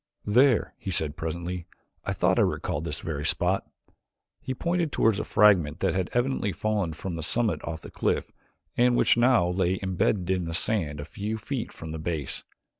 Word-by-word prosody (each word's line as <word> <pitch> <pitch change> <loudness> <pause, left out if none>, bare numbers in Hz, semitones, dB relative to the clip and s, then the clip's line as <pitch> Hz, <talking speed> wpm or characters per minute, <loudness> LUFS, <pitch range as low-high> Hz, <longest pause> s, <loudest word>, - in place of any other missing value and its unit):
"There," 125 +3 +4
he - - -6
said 80 -4 +1
presently, 85 +2 -4 0.4
"I - - -2
thought - - +2
I - - +6
recalled 75 +3 -1
this 80 -1 -4
very 75 -3 -4
spot." 90 +4 +1 0.7
He 130 - -4
pointed 170 +1 0
toward 110 -3 +2
a - - -1
fragment 90 -8 +4
that 95 -3 +2
had 95 -1 -1
evidently 120 -4 0
fallen 105 -6 -1
from 85 +2 -5
the - - -4
summit 110 +7 +1
of 80 -1 -6
the - - -9
cliff - - -1 0.4
and 120 0 +4
which - - +4
now 120 -6 +4
lay 90 +1 +1
imbedded 95 0 0
in 90 -2 0
the 80 0 -3
sand 85 -8 0
a 75 - -5
few 105 +7 -4
feet 120 +2 -4
from 80 0 -8
the 80 - -5
base. 80 -3 -3
95 Hz, 190 wpm, -27 LUFS, 80-110 Hz, 0.7 s, I